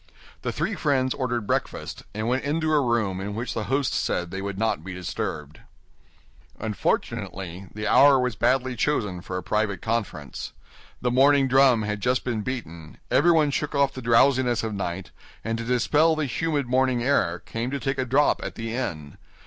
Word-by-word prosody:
The - - -2
three 220 - -2
friends 135 -7 +1
ordered 120 -4 -2
breakfast, - - -2
and 110 +1 -2
went 130 +2 0
into 155 +2 0
a 150 - +4
room 110 -7 0
in 100 +1 -4
which 120 +3 -3
the 110 - -3
host 135 0 0
said 90 -1 -1
they 95 - -4
would 100 -1 -4
not 110 -7 0
be 90 0 -7
disturbed. 75 -4 -5 1.0
Unfortunately, 95 -3 -3
the 105 0 -5
hour 140 +3 +6
was 125 -3 0
badly 130 +4 +1
chosen 105 -8 -1
for 90 +1 -5
a 90 - -5
private 105 -1 0
conference. 110 -10 -4 0.5
The 125 - +1
morning 135 +2 +5
drum 130 -3 +5
had 105 -1 -3
just 125 +3 +1
been 120 -4 -2
beaten; 85 -11 -6
everyone 155 -1 +4
shook 150 +1 -2
off 140 -1 +2
the 130 - -7
drowsiness 120 0 +3
of 110 -1 -3
night, 95 -1 -4 0.3
and 115 +1 -1
to - - -3
dispel 145 +7 +3
the 155 -1 -1
humid 145 +2 -1
morning 125 -1 +1
air, 90 -11 +2
came 115 +6 -4
to 140 +1 -3
take 135 +2 -2
a - - +2
drop 135 +4 +2
at - - -5
the 115 0 -5
inn. 75 - -4
120 Hz, 180 wpm, -25 LUFS, 100-135 Hz, 1.0 s, hour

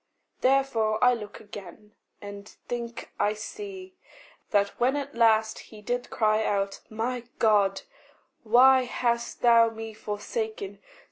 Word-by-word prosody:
Therefore 255 -5 +2
I 250 0 +6
look 210 -3 -7
again 205 0 -11 0.3
and 200 0 -9 0.2
think 235 -1 -5
I 210 - +2
see 380 - -8 0.6
That, 200 -1 +2
when 255 +3 +2
at 285 0 -4
last 220 -2 +3
he 215 - -12
did 245 +3 -2
cry 215 -1 +2
out, 195 -2 -1
"My 240 +3 -3
God, 205 -3 +3 0.6
Why 255 +3 +6
hast 235 -1 -2
thou 230 -1 +6
me 225 0 -7
forsaken?" 210 -1 -5
225 Hz, 125 wpm, -27 LUFS, 210-245 Hz, 0.6 s, I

